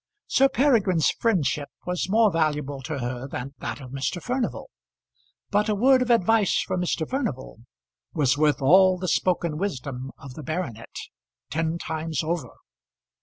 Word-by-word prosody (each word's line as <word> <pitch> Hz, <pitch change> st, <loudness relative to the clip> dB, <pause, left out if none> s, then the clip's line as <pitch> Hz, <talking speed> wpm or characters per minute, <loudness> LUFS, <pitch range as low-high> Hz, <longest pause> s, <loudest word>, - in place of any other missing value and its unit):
Sir 270 Hz, +1 st, +4 dB
Peregrine's 215 Hz, -, +3 dB
friendship 150 Hz, -, 0 dB, 0.2 s
was 180 Hz, +1 st, -2 dB
more 220 Hz, 0 st, +4 dB
valuable 150 Hz, -4 st, -1 dB
to 145 Hz, +2 st, -4 dB
her 125 Hz, 0 st, -4 dB
than 135 Hz, 0 st, -6 dB
that -, -, -5 dB
of 130 Hz, -3 st, -10 dB
Mr. 135 Hz, +6 st, -2 dB
Furnival, 250 Hz, -, -3 dB, 0.8 s
but 210 Hz, +2 st, +2 dB
a 210 Hz, -, +2 dB
word 260 Hz, +5 st, +4 dB
of 250 Hz, -, -1 dB
advice 225 Hz, -2 st, +3 dB
from 180 Hz, -, -2 dB
Mr. 165 Hz, -2 st, -1 dB
Furnival 225 Hz, -, -3 dB, 0.5 s
was 145 Hz, -4 st, +2 dB
worth 145 Hz, -2 st, +2 dB
all 185 Hz, +5 st, +6 dB
the 185 Hz, 0 st, -4 dB
spoken 170 Hz, -2 st, 0 dB
wisdom 135 Hz, -8 st, -4 dB
of 135 Hz, -2 st, -11 dB
the 155 Hz, -, -8 dB
baronet, 140 Hz, -7 st, -5 dB, 0.6 s
ten 160 Hz, +2 st, -1 dB
times 160 Hz, -2 st, -3 dB
over. 170 Hz, +1 st, -2 dB
165 Hz, 150 wpm, -25 LUFS, 140-200 Hz, 0.8 s, all